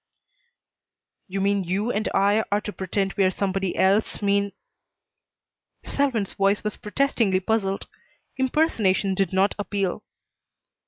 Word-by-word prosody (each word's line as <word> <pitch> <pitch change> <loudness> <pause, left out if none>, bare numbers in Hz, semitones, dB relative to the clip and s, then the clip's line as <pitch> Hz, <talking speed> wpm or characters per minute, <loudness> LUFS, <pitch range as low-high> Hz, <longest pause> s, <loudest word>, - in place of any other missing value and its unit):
"You 195 0 -3
mean 200 0 +1
you 195 +7 -1
and 215 0 -1
I 205 +3 +3
are 205 - +3
to 210 - -6
pretend 195 +1 -2
we 200 - +1
are 185 - +4
somebody 190 0 -1
else, 200 +3 +2
mean 200 -1 +1 0.7
" - - -39
Selwyn's 250 -8 0
voice 195 +1 +1
was 210 0 -2
protestingly 210 -4 +1
puzzled. 195 -1 -1 0.5
Impersonation 230 - +1
did 190 -2 0
not 195 +1 +2
appeal. 200 -1 -2
200 Hz, 125 wpm, -24 LUFS, 195-210 Hz, 0.7 s, are